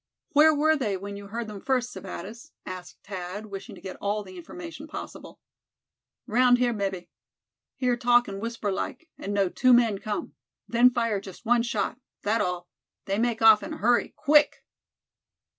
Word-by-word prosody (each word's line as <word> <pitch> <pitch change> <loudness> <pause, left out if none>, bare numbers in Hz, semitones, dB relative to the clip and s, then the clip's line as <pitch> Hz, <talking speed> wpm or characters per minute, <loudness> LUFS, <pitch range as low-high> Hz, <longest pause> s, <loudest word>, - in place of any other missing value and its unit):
"Where 310 0 +7
were 310 +1 +3
they 215 -9 -1
when 200 +2 -7
you 200 0 -9
heard 230 +3 -4
them 210 -2 -8
first, 250 -2 0
Sebattis?" 215 - -8
asked 185 -1 -9
Thad, 190 +1 -6
wishing 200 -2 -8
to - - -14
get 190 - -7
all 205 +1 -1
the 185 -1 -12
information 320 - -9
possible. - - -9 0.9
"Round 245 +1 +4
here, 245 -1 +2
mebbe. 195 -4 -3 0.7
Hear 250 -2 +1
talk 240 0 +4
in 195 0 -5
whisper 230 -2 -3
like, 255 - -4
and 200 - -4
know 200 -1 +2
two 255 +7 +4
men 230 -5 +4
come. 210 0 -4 0.3
Then 240 +2 +5
fire 230 -5 0
just 195 +3 -12
one 240 +1 +4
shot. 230 0 -2 0.2
That 220 +2 +1
all. 180 -1 -2 0.4
They 195 +2 -1
make 235 -1 0
off 220 -1 +8
in - - -6
hurry, 240 +3 +2
quick!" 300 0 +4
225 Hz, 170 wpm, -27 LUFS, 195-245 Hz, 0.9 s, off